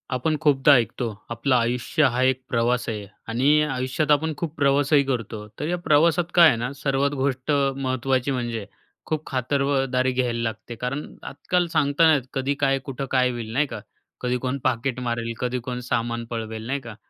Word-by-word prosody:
आपण 155 +5 0
खूपदा 145 -2 +5
ऐकतो, 120 0 0 0.2
आपलं 125 +3 +1
आयुष्य 120 +5 +1
हा 125 - 0
एक 130 0 +2
प्रवास 120 -1 +1
आहे 105 -2 -4 0.2
आणि 140 +6 +3
आयुष्यात 135 +1 -1
आपण 155 +2 +2
खूप 165 -1 -4
प्रवासही 140 +1 +3
करतो, 115 -5 -3
तर 150 - -2
या 175 +2 0
प्रवासात 170 +1 +2
काय 170 -2 +9
आहे 140 - +4
ना 120 +3 -3
सर्वात 140 0 0
गोष्ट 130 +1 -1
महत्त्वाची 135 -2 0
म्हणजे, 120 -4 -3 0.4
खूप 155 -1 -3
खातर 130 +2 -1
व 140 -1 +2
दारी 130 0 +2
घ्यायला 125 -2 -1
लागते 115 +1 -5
कारण 125 +5 -3 0.2
आजकाल 175 +5 -1
सांगता 150 0 +2
नाही 160 - +6
येत. 130 - -6
कधी 135 +1 0
काय, 135 -1 +1
कुठं 135 0 -5
काय, 125 -1 +3
होईल, 115 -2 -6
नाही 145 +4 +2
का? - - -6 0.4
कधी 125 0 0
कोण 130 +2 -2
पाकीट 130 0 0
मारेल? 115 -1 -2
कधी 125 0 -1
कोण 125 0 -3
सामान 115 0 -1
पळवेल, 110 -1 -5
नाही 140 +2 -1
का? 115 -4 -9
130 Hz, 185 wpm, -24 LUFS, 120-145 Hz, 0.4 s, काय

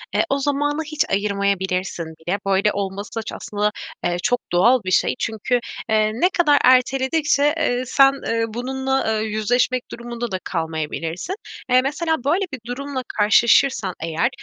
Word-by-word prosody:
eee, - - +4
o 275 - +1
zamanı 290 +2 0
hiç 310 -1 0
ayırmayabilirsin 195 -3 -1
bile. 160 +5 -4
Böyle 195 +2 +3
olması 200 +3 -4
ça - - -5
aslında, 210 0 -1 0.3
eee, 175 0 0
çok 245 0 +2
doğal 230 +9 +4
bir 185 - -2
şey. - - +2
Çünkü, 225 +3 -1 0.3
eee, 215 0 +3
ne 305 +11 +2
kadar 300 -6 +3
erteledikçe, 270 +3 +3
eee, 255 -6 0
sen, 275 +1 +5
eee, 230 0 +1
bununla, 260 -1 -1
eee, - - -1
yüzleşmek 245 +4 0
durumunda 235 -1 -5
da 185 - -2
kalmayabilirsin. 165 - -3 0.3
Eee, 255 0 +5
mesela 315 +1 -1
böyle 345 +8 +1
bir 260 - -4
durumla 265 +1 -4
karşılaşırsan 215 -1 +4
eğer, 165 +8 0
235 Hz, 150 wpm, -21 LUFS, 200-270 Hz, 0.3 s, sen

